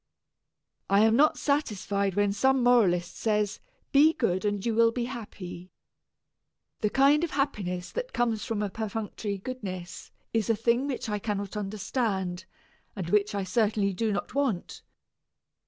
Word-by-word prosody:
I 200 +1 +5
am 220 +1 +5
not 300 +4 +4
satisfied 200 -9 0
when 205 -1 +2
some 265 +3 +2
moralist 190 -8 +3
says, 210 -2 0 0.3
"Be 300 +3 +6
good 190 - 0
and 205 0 -1
you 230 - +1
will 230 +1 +5
be 240 0 -2
happy." 205 -7 -8 1.1
The 210 - +1
kind 280 +6 +4
of 340 - 0
happiness 200 -12 -2
that - - -4
comes 230 -3 0
from 225 -4 -2
a 200 - -2
perfunctory 215 -1 -4
goodness 190 -5 -7 0.2
is 225 -2 0
a 225 - +4
thing 235 +5 +1
which 265 -5 -3
I 210 -1 -1
cannot 205 -1 -3
understand, 195 -3 -2 0.5
and 180 -4 -4
which 210 0 +2
I 200 - -1
certainly 210 -1 +1
do 220 +3 0
not 200 - -3
want. 260 -10 -1
210 Hz, 150 wpm, -28 LUFS, 195-245 Hz, 1.1 s, Be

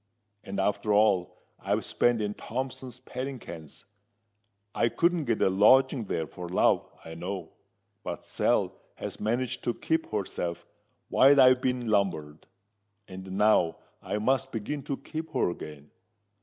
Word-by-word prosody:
And 100 0 -5
after 105 +2 0
all 100 -4 +3 0.2
I've - - -1
spent 120 -3 +1
in 105 0 -2
Thompson's 130 +1 -5
padding 130 +1 -5
kens, 80 - -11 0.9
I 115 - +2
couldn't 170 +3 +1
get 115 -3 +1
a - - +4
lodging 130 +5 +5
there 80 - -2
for 90 +3 -8
love, 90 - +2 0.2
I 80 - -8
know. 90 +3 -5 0.5
But - - -6
Sal - - +1 0.2
has - - -6
managed 120 +3 -1
to 120 - 0
keep 160 0 -1
herself 85 -4 -3 0.4
while 140 +1 +6
I've 130 -1 +7
been 125 -2 -1
lumbered; 90 -8 -1 0.6
and 95 0 -8
now 100 -4 +3 0.2
I - - -3
must 135 +4 +1
begin 130 +7 -4
to 140 - -3
keep 160 0 -7
her - - +1
again. 75 -3 -10
110 Hz, 140 wpm, -28 LUFS, 95-130 Hz, 0.9 s, I've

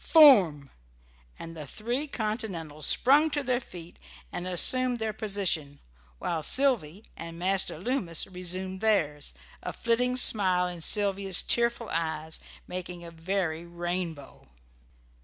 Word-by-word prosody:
Form!" 190 - +5 0.7
and 165 0 -10
the 150 -3 -9
three 240 - -4
Continentals 195 - -3
sprung 290 +5 +3
to 290 -1 -2
their 250 -2 -1
feet 175 -8 -13 0.3
and 175 +1 -5
assumed 250 +7 +3
their 220 -1 -3
position, 185 -10 -1 0.4
while 165 - -3
Sylvy 215 - +1
and 165 0 -8
Master 185 -1 0
Loomis 185 - -1
resumed 185 +1 -4
theirs, 155 -10 0 0.3
a - - -5
flitting 250 +2 -1
smile 185 -7 +6
in 175 -1 -8
Sylvia's 195 0 +3
tearful 235 -1 0
eyes 160 -1 -3 0.3
making 180 -1 -8
a 170 - -10
very 165 -1 -3
rainbow. 175 -3 -6
185 Hz, 120 wpm, -27 LUFS, 165-230 Hz, 0.7 s, smile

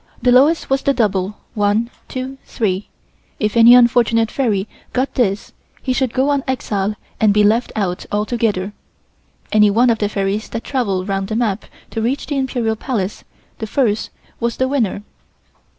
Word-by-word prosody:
The 250 - +3
lowest 285 +7 +4
was 270 0 +1
the 280 - +1
double 205 -3 0 0.2
1, 210 +3 +1 0.2
2, 260 +1 -6
3. 200 -3 -2 0.5
If 210 +1 -1
any 235 +1 +8
unfortunate 235 -2 +4
fairy 215 -7 0 0.3
got 255 +2 0
this 210 -4 -1 0.3
he 260 - 0
should 255 -1 0
go 265 +3 +1
on 285 -2 +1
exile 210 -5 -1 0.2
and 215 -2 +4
be 210 +1 +4
left 225 +4 +2
out 190 -4 -2
altogether. 210 -2 -1 0.8
Any 210 -1 +5
one 235 +4 +4
of 225 - -1
the 205 - 0
fairies 200 +1 -2
that 230 - -5
travelled 200 -8 -1
round 195 -1 -1
the 215 - -3
map 220 -3 -1 0.3
to 225 - -3
reach 255 +5 -1
the 290 - -3
Imperial 245 -4 -1
Palace, 215 -5 -3 0.4
the 220 - -4
first, 220 -4 0 0.3
was 235 0 -1
the 260 - +1
winner. 235 -7 -1
225 Hz, 165 wpm, -18 LUFS, 205-255 Hz, 0.8 s, any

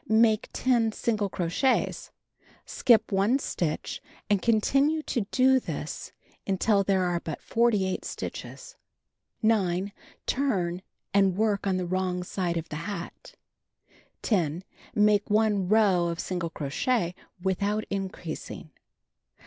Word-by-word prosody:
Make 220 -1 +4
10 235 -4 +2
single 215 -4 -1
crochets; 180 +10 0 0.6
skip 225 -3 +3
1 200 +6 +3
stitch 170 - -3 0.3
and 200 -2 +3
continue 275 +7 +2
to 230 -9 -2
do 260 0 +4
this 155 - -6 0.4
until 200 +1 +2
there 190 -1 +2
are 175 -1 0
but 160 -3 -6
48 210 -5 +1
stitches. - - -7 0.7
9. 200 -3 +2 0.3
Turn, 185 -10 0 0.3
and 195 -2 +3
work 210 -2 +1
on 190 -1 +1
the 180 - -2
wi'ong 180 0 -1
side 175 -2 -2
of 165 0 -4
the 150 - -4
hat. 190 -4 -7 0.9
10. 175 -5 0 0.3
Make 210 -1 +3
1 210 -3 +2
row 195 -4 +4
of 170 0 -3
single 175 -3 -2
crochet 170 - -1 0.3
without 200 +3 0
increasing. 190 -5 -5
200 Hz, 115 wpm, -27 LUFS, 180-220 Hz, 0.9 s, Make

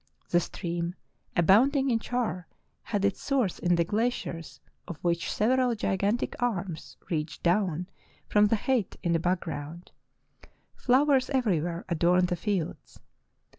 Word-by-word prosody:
The 175 - +4
stream, 170 0 -4 0.4
abound 210 - +5
ing 270 -1 +2
in 230 - +2
char, 225 -7 -2 0.4
had 205 -2 0
its 200 - 0
source 260 -10 0
in 175 -1 +2
the 170 - +3
glaciers 205 -4 -2 0.3
of 175 - -6
which 170 -1 0
sev 215 +4 +1
eral 255 -3 +2
gigantic 205 +3 0
arms 195 -8 -3
reached 155 -1 -3
down 180 -1 +1 0.4
from 210 0 +4
the 225 - +2
height 235 -1 0
in 170 - +1
the 165 - +2
background. 170 -2 -3 0.8
Flowers 265 +1 +3
everywhere 175 - 0
adorned 175 +1 +2
the 180 - 0
fields. 185 -2 -3
185 Hz, 135 wpm, -28 LUFS, 170-235 Hz, 0.8 s, abound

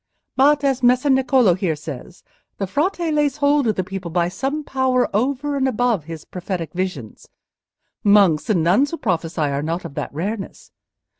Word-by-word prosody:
But, 285 +2 +4
as 270 -2 +1
Messer 255 +3 +3
Niccolò 260 -7 +3
here 180 -4 -1
says, 150 +3 -9 0.3
the 195 - -2
Frate 325 - -1
lays 295 -2 +1
hold 285 -2 +2
of 215 - +1
the 185 - -1
people 185 -1 -6
by 170 +1 0
some 275 +9 -3
power 260 -2 +1
over 280 +5 0
and 270 -1 +1
above 235 - 0
his 165 -1 -8
prophetic 180 -2 -5
visions. 180 - -5 0.8
Monks 200 -4 +4
and 180 -7 +2
nuns 200 - +3
who 335 - -5
prophesy 170 - -2
are 140 -1 0
not 165 +4 -3
of 160 - -7
that - - -4
rareness. 195 +7 -5
210 Hz, 170 wpm, -21 LUFS, 170-270 Hz, 0.8 s, But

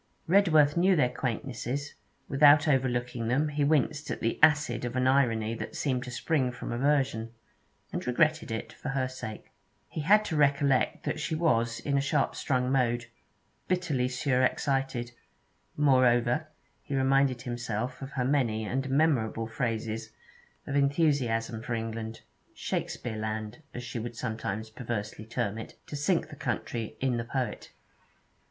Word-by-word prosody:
Redworth 160 -6 +5
knew 185 +2 +4
their 125 -6 +3
quaintnesses; 130 +3 -3 0.3
without 145 +2 +6
overlooking 125 -4 0
them 140 +6 +2
he 145 0 0
winced 145 0 +1
at - - -3
the 115 - -1
acid 145 -6 +4
of 120 0 -3
an 130 0 +1
irony 115 -5 +2
that 115 - -6
seemed 130 -3 -1
to - - -7
spring 130 0 0
from 125 - -6
aversion, 125 -3 +1 0.6
and - - -4
regretted 155 +5 +2
it, 115 0 -4
for 150 - -6
her 135 -1 0
sake. 130 -4 -8 0.4
He 155 - -5
had 210 +7 +5
to 160 - -2
recollect 140 -2 +2
that - - -2
she 160 - -2
was 115 -8 +1
in 140 -1 0
a - - +1
sharp 140 0 0
strung 130 -1 0
mood, 120 -2 +1 0.6
bitterly 165 -9 0
surexcited; 130 -1 0 0.7
moreover 130 0 +3 0.3
he 140 - -4
reminded 135 -1 +2
himself 120 0 -3
of 135 0 -7
her 125 -2 0
many 120 -6 +1
and 135 +5 -2
memorable 135 -6 +2
phrases 115 -1 -3 0.6
of 140 - -3
enthusiasm 140 -6 +1
for 120 0 -3
England 115 0 -5 0.3
Shakespeareland, 110 +2 -4
as 120 - -5
she 120 0 -5
would 120 +1 -5
sometimes 110 -2 -4
perversely 110 -2 -5
term 110 -2 -2
it, 110 - -9
to - - -7
sink 155 +3 +1
the 150 - -9
country 115 -4 -3
in 130 -2 +1
the 115 - -2
poet. 130 +1 -3
130 Hz, 145 wpm, -29 LUFS, 115-145 Hz, 0.7 s, without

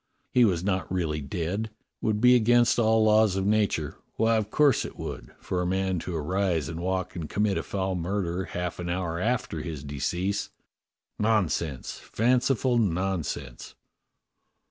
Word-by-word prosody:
He 125 -1 +6
was 90 -5 +1
not 95 -2 -1
really 80 -5 -1
dead. 85 +9 -2
It - - -33 0.3
would 105 -1 0
be 125 +1 +7
against 120 0 +4
all 110 -1 +4
laws 110 -2 +4
of 95 0 -1
nature 100 -8 0
— - - -43
why, 115 0 +3
of 105 -1 -2
course 145 0 +3
it - - -8
would - - -6
— - - -34
for 90 - -2
a 90 - -1
man 95 -1 0
to 90 +1 -5
arise 85 0 0
and 80 0 -5
walk 95 0 -2
and 80 -3 -5
commit 105 -1 +1
a - - 0
foul 95 -1 -2
murder 90 0 -2
half 90 -2 -4
an 90 0 -4
hour 85 -2 -2
after 110 -7 -1
his 75 -3 -6
decease! 85 +8 -2 0.7
Nonsense, 90 - 0
fanciful 125 +1 +1
nonsense!" 85 - -2
95 Hz, 165 wpm, -27 LUFS, 85-110 Hz, 0.7 s, be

